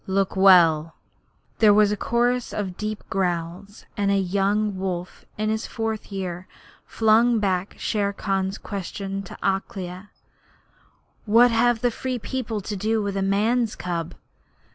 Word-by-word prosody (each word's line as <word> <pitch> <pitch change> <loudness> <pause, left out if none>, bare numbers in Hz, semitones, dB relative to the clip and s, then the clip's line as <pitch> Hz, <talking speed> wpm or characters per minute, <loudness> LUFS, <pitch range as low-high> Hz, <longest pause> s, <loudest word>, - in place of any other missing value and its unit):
Look 195 0 0
well!' 170 -5 +5 0.6
There 210 -2 +6
was 210 -1 +4
a - - +1
chorus 240 +3 0
of 190 -4 -3
deep 215 +1 -4
growls, 180 +2 -3
and 200 -1 0
a 200 - +3
young 200 +2 0
wolf 180 -2 -5
in 215 0 0
his 220 +1 -2
fourth 220 -2 -4
year 185 -2 -5 0.4
flung 225 +2 +3
back 190 -2 -1
Shere 205 -2 -1
Khan's 195 0 -2
question 195 0 -5
to 195 - -10
Akela: 190 0 -3 1.2
'What 230 +3 +5
have 230 0 +2
the 245 -1 +2
Free 255 +2 -3
People 230 -3 -4
to 205 +2 -5
do 220 +3 0
with 200 -1 -3
a 195 - -1
man's 215 +4 +1
cub?' 170 -1 -4
200 Hz, 140 wpm, -24 LUFS, 190-220 Hz, 1.2 s, There